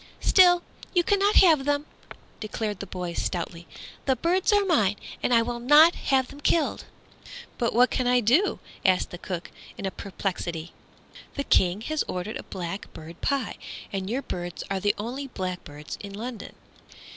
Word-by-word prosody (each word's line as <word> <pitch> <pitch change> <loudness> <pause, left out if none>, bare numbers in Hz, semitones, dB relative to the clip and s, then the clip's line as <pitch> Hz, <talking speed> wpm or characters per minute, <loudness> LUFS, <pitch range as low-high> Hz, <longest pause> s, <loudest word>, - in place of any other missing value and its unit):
"Still, 355 -2 +5 0.3
you 350 - +5
cannot 405 +2 +2
have 320 -7 +6
them," 290 +1 0 0.5
declared 215 -2 -3
the 200 - -6
boy 180 -2 -5
stoutly, 170 -1 -3 0.4
"the 265 - +4
birds 345 - +1
are 410 -1 +4
mine, 215 - +3 0.3
and - - 0
I 230 -1 +5
will 240 +1 -4
not 295 +7 +7
have 265 -2 +1
them 285 - -11
killed." 330 +1 +1 0.7
"But 235 - +1
what 250 +2 +5
can 255 - 0
I 250 0 +4
do?" 255 - +3 0.3
asked 185 -2 +2
the 175 - -7
cook, 180 -2 -5 0.3
in - - -5
perplexity; 175 -4 -4 0.6
"the 280 - -1
King 185 -5 +3
has 310 +6 -1
ordered 185 +4 -4
a - - -7
blackbird 170 -2 -7
pie, 275 -6 -1 0.4
and 195 -1 -3
your 260 +5 -2
birds 175 -1 -5
are 195 - 0
the 205 +1 +1
only 250 +6 -4
blackbirds 180 - -6
in 200 -1 -8
London." 230 +1 -7
230 Hz, 160 wpm, -26 LUFS, 185-285 Hz, 0.7 s, not